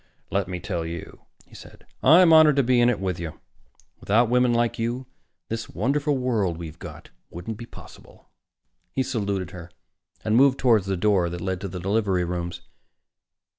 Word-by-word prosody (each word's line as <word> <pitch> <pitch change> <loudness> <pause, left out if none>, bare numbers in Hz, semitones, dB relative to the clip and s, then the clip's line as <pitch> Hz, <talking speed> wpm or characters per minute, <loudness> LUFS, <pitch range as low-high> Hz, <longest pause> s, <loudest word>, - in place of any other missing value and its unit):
"Let 100 -1 0
me 90 -1 -5
tell 85 -1 -3
you," 85 +1 -8 0.2
he - - -24
said, - - -14 0.2
"I'm 170 0 +7
honored 155 -2 +7
to 140 - +3
be 125 0 +3
in 120 - +5
it 120 - 0
with 95 -3 -3
you. 85 -2 -7 0.6
Without 115 +3 +2
women 125 0 +3
like 120 -1 0
you, 120 +3 -2 0.4
this 115 0 -5
wonderful 145 +2 0
world 110 -10 -1
we've 80 -2 -9
got - - -11 0.2
wouldn't 90 +6 -7
be 120 - -8
possible." - - -15 0.7
He 130 - 0
saluted 100 -7 -3
her 90 -2 -10 0.6
and 110 - +1
moved 135 +1 +5
toward 115 -6 +3
the 95 -1 -2
door 95 -2 +2
that 90 +1 -6
led 95 0 -3
to 100 - -4
the 90 -1 -6
delivery 95 -1 0
rooms. 85 0 -4
105 Hz, 175 wpm, -24 LUFS, 90-125 Hz, 0.7 s, I'm